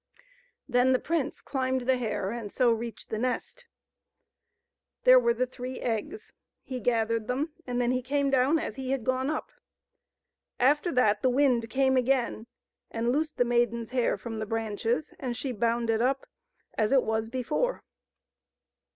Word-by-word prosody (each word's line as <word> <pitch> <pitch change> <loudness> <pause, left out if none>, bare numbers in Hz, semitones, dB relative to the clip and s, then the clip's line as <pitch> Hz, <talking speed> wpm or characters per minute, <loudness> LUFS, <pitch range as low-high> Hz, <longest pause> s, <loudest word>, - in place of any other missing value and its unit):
Then 250 0 +3
the 255 - +3
prince 315 -4 -2
climbed 260 -1 -1
the 260 +1 +2
hair 215 -5 -2
and 230 -3 -5
so 245 -2 +3
reached 230 0 -4
the 220 - -2
nest. 255 - -3 1.4
There - - +8
were 470 -1 +2
the 255 - +1
three 255 0 -7
eggs; 240 - -4 0.3
he 255 -2 -5
gathered 230 -1 0
them, 285 +6 -1 0.2
and 245 0 -1
then 245 0 +2
he 255 0 0
came 280 +2 0
down 270 +4 +3
as 230 -8 -4
he 260 -1 -4
had 270 -3 -1
gone 260 +3 0
up. 310 - -3 1.1
After 295 +7 +3
that 215 -5 +3
the 260 - +3
wind 250 -3 +2
came 265 +2 +2
again 250 -3 0 0.4
and 235 +1 -1
loosed 305 +3 -1
the 245 - +3
maiden's 235 -1 0
hair 250 -2 +1
from 225 -2 -6
the 215 - -3
branches, 225 +5 -2
and 245 -3 -3
she 270 - -3
bound 235 +1 0
it 225 0 +1
up 265 +2 +1 0.5
as 215 -1 +2
it 270 -2 +5
was 220 0 -1
before. 260 - -1
250 Hz, 165 wpm, -28 LUFS, 230-270 Hz, 1.4 s, There